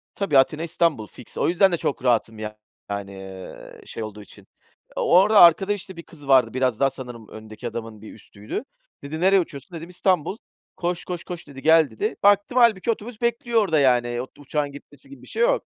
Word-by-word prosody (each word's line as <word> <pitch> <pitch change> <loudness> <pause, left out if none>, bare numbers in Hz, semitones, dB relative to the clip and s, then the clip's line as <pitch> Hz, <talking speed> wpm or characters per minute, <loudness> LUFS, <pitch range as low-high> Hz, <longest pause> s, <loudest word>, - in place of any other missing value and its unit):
Tabii, 195 -9 +1
Atina, 150 +4 +3
İstanbul 165 -9 0
fiks. 125 - -14
O - - +1
yüzden 185 +2 +4
de 170 - 0
çok 140 - -3
rahatım 115 -3 +1
yani, 110 0 -6 0.6
eee, 95 -1 -11
şey 115 - -6
olduğu 105 -1 -8
için. 100 - -16 0.5
Orada 200 +4 +5
arkada 190 +4 +6
işte 190 -2 -8
bir 170 - -8
kız 145 -4 -14
vardı. 135 -2 +4
Biraz 130 -3 0
daha 135 - +3
sanırım 125 -4 -10
öndeki 110 +2 -9
adamın 115 -2 -7
bir 110 - -11
üstüydü. 105 - -7 0.4
Dedi 150 +3 -6
“Nereye 190 +1 +5
uçuyorsun?“ 170 +1 -6
Dedim 165 +2 -9
“İstanbul. 180 0 0 0.4
Koş, 175 0 -3
koş, 175 -2 -5
koş, 175 -2 -8
dedi, 135 -2 -11
gel“ 160 -1 +5
dedi. 210 - -3
Baktım, 205 +4 +3
hâlbuki 230 -3 +4
otobüs 225 +1 -7
bekliyor 235 -1 +1
orada, 165 -7 +2
yani, 120 -3 +2 0.2
uçağın 145 0 -2
gitmesi 145 - -14
gibi 280 - -13
bir - - -15
şey 460 - -4
yok. - - +2
155 Hz, 190 wpm, -23 LUFS, 120-190 Hz, 0.6 s, arkada